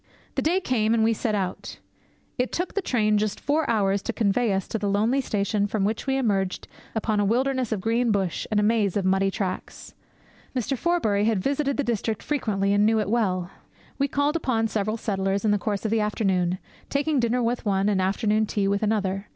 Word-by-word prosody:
The - - -1
day 345 +5 +2
came, 230 - +1
and 225 - +2
we 225 +1 +3
set 220 -1 -1
out. 190 -3 -4 0.6
It 250 - 0
took 355 +2 -2
the 400 - 0
train 215 - +2
just 210 -1 -2
four 300 +1 0
hours 200 -3 +2
to 235 - -3
convey 220 +1 +1
us 195 -1 -1
to 225 - -2
the 205 -1 -1
lonely 220 +7 +2
station 205 -3 0
from 200 -1 -1
which 220 +6 -2
we 270 0 +1
emerged 195 -7 -1 0.3
upon 215 -1 0
a - - +3
wilderness 255 +3 +1
of 210 -4 -1
green 230 +3 +1
bush 195 -4 -1
and 210 - +2
a - - +2
maze 210 -3 +2
of 195 - -1
muddy 190 +1 +2
tracks. 190 -1 -5 0.6
Mr. 255 +2 -1
Forbury 225 -10 +1
had 225 -1 +2
visited 280 0 0
the 285 - +1
district 225 -3 -2
frequently, 200 -9 0
and 205 0 +3
knew 220 +1 +3
it 210 -1 -1
well. 185 -6 0 0.5
We 280 - +2
called 285 +3 0
upon 230 -8 0
several 215 +1 -1
settlers 195 -1 -1
in 210 - +3
the 205 - +2
course 205 +2 -2
of 215 - 0
the 225 -1 +2
afternoon, 190 -4 0 0.3
taking 285 0 +1
dinner 240 +1 +1
with 235 +1 -1
one, 195 -1 +1
and 200 -2 +2
afternoon 210 +3 +1
tea 200 -1 0
with 200 0 +1
another. 200 -2 -1
215 Hz, 210 wpm, -25 LUFS, 200-240 Hz, 0.6 s, we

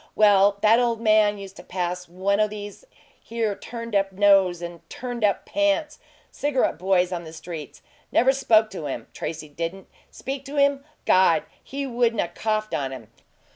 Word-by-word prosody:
Well, 205 -1 +5
that 220 +2 +6
ole 240 -1 +2
man 215 -2 +3
used 195 -1 -10
to - - -11
pass 180 -1 -4
one 195 +3 0
o' 215 - +4
these 205 - -9 0.4
here 225 -2 -2
turned 230 0 -7
up 195 -1 +2
nose 195 -2 +4
and 170 -1 -7
turned 245 -2 -5
up 205 -1 +1
pants 300 0 0 0.3
cigarette 270 - 0
boys 180 -1 +2
on 175 -1 -3
the 160 - -10
streets. 160 -2 -9 0.3
Never 265 +3 +4
spoke 225 -5 +3
to 160 -6 -5
him, 135 - -6
Tracy 160 -1 -5
didn't. 165 +6 -5 0.2
Speak 270 0 -6
to 285 +1 -7
him? 280 -1 +3 0.2
God! 175 -4 +4 0.2
he 280 +1 -5
wouldn't 240 -3 0
'a' 170 - 0
coughed 215 +3 -2
on 135 -2 -1
him! 120 -5 -9
205 Hz, 175 wpm, -24 LUFS, 180-235 Hz, 0.4 s, that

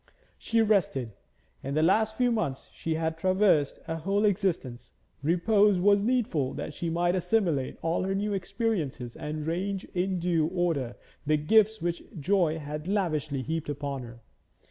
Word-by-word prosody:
She 230 0 +2
rested. 170 - +1 0.5
In 140 +2 -4
the 155 - +3
last 220 +5 +2
few 245 -1 +3
months 145 - -2
she 160 -1 -2
had 160 0 -2
traversed 185 -5 +3
a 165 - -2
whole 195 +6 +1
existence; 180 - -1 0.3
repose 195 +5 +3
was 200 +2 +4
needful 210 - 0
that - - -5
she 170 +3 -3
might 175 +1 +1
assimilate 180 - 0
all 165 +1 0
her 195 +1 -1
new 205 +1 -1
experiences 180 - -2
and 150 0 -5
range 190 +4 -2
in 185 0 0
due 170 -3 +1
order 165 -9 -1 0.3
the 155 0 +4
gifts 215 +5 +3
which 175 0 -1 0.2
joy 170 0 +2
had 150 +1 -6
lavishly 155 -9 -1
heaped 160 0 -3
upon 140 -2 -3
her. 120 -1 -11
170 Hz, 155 wpm, -28 LUFS, 150-200 Hz, 0.5 s, was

